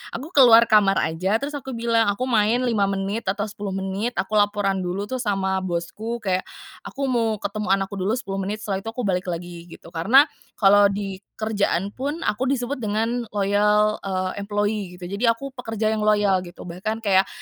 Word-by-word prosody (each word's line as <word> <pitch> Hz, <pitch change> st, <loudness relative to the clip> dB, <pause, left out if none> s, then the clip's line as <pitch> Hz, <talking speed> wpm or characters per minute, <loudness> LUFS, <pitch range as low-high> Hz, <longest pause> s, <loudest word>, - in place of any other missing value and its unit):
aku 280 Hz, +8 st, -7 dB
keluar 240 Hz, -7 st, +8 dB
kamar 205 Hz, -2 st, +5 dB
aja, 175 Hz, +6 st, 0 dB
terus 280 Hz, +6 st, -2 dB
aku 265 Hz, -3 st, -6 dB
bilang, 230 Hz, -1 st, +2 dB
aku 205 Hz, +5 st, 0 dB
main 235 Hz, 0 st, +2 dB
5 220 Hz, -5 st, +1 dB
menit, 195 Hz, +3 st, -3 dB
atau 200 Hz, +2 st, 0 dB
10 205 Hz, -2 st, -5 dB
menit. 195 Hz, +5 st, -3 dB
Aku 215 Hz, 0 st, +1 dB
laporan 205 Hz, -2 st, +1 dB
dulu 185 Hz, +2 st, -3 dB
tuh 255 Hz, +5 st, -4 dB
sama 195 Hz, -4 st, 0 dB
bosku, 190 Hz, +6 st, -4 dB
kayak, 185 Hz, -2 st, -1 dB, 0.4 s
"Aku 275 Hz, -1 st, -3 dB
mau 230 Hz, -3 st, +1 dB
ketemu 210 Hz, +1 st, -4 dB
anakku 195 Hz, 0 st, -4 dB
dulu, 200 Hz, +5 st, 0 dB
10 195 Hz, -6 st, -4 dB
menit, 205 Hz, +3 st, -4 dB
setelah 195 Hz, -2 st, -2 dB
itu 195 Hz, -, -11 dB
aku 230 Hz, +2 st, -4 dB
balik 185 Hz, -2 st, -1 dB
lagi," 175 Hz, 0 st, -6 dB
gitu. 165 Hz, -1 st, -13 dB
Karena, 200 Hz, -, +5 dB, 0.3 s
kalau 205 Hz, 0 st, +6 dB
di 195 Hz, -1 st, -4 dB, 0.2 s
kerjaan 200 Hz, -3 st, -1 dB
pun, 285 Hz, +8 st, -4 dB
aku 245 Hz, +5 st, 0 dB
disebut 255 Hz, +2 st, -3 dB
dengan, 225 Hz, +2 st, -1 dB
loyal, 210 Hz, +1 st, +2 dB
eee, 185 Hz, -1 st, -2 dB
employee, 205 Hz, -2 st, -2 dB
gitu. 180 Hz, 0 st, -8 dB
Jadi, 210 Hz, +5 st, 0 dB
aku 230 Hz, +4 st, 0 dB
pekerja 225 Hz, -3 st, -2 dB
yang 220 Hz, -, -1 dB
loyal 205 Hz, -3 st, +3 dB
gitu, 175 Hz, 0 st, -11 dB
bahkan 215 Hz, +6 st, -4 dB
kayak, 195 Hz, -2 st, +3 dB
205 Hz, 185 wpm, -23 LUFS, 195-230 Hz, 0.4 s, keluar